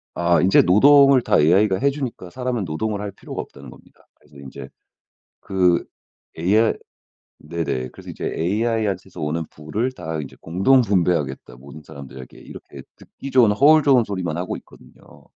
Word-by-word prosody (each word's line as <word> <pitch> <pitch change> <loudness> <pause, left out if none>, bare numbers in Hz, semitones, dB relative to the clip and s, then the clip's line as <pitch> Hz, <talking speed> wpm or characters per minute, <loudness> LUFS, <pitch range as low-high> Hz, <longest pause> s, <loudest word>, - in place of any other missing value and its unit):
아 85 0 +2
인제 95 +2 +5
노동을 135 +7 +5
다 - - +2
AI가 95 +5 +3
해 140 - +2
주니까 130 -10 -6
사람은 125 -1 -3
노동을 100 +6 -3
할 105 -1 -5
필요가 - - -7
없다는 - - -13
겁니다. - - -20
그래서 70 - -21
인제 70 -1 -10 0.7
그 90 -3 +1 0.5
AI 105 +7 +2 0.7
네네. 75 -6 -3
그래서 - - -14
이제 - - -7
"AI한테서 105 +3 -2
오는 75 +2 -2
부를 100 +12 -4
다 80 -10 -6
이제 70 - -10
공동 95 +11 +3
분배하겠다, 85 - -1
모든 70 +4 -13
사람들에게." 65 -2 -12
이렇게 - - -12
듣기 140 - -11
좋은 125 -5 +4
허울 150 +8 +5
좋은 130 -4 +4
소리만 90 -5 -4
하고 90 +1 -4
있거든요. - - -19
95 Hz, 355 characters per minute, -21 LUFS, 80-115 Hz, 0.7 s, 인제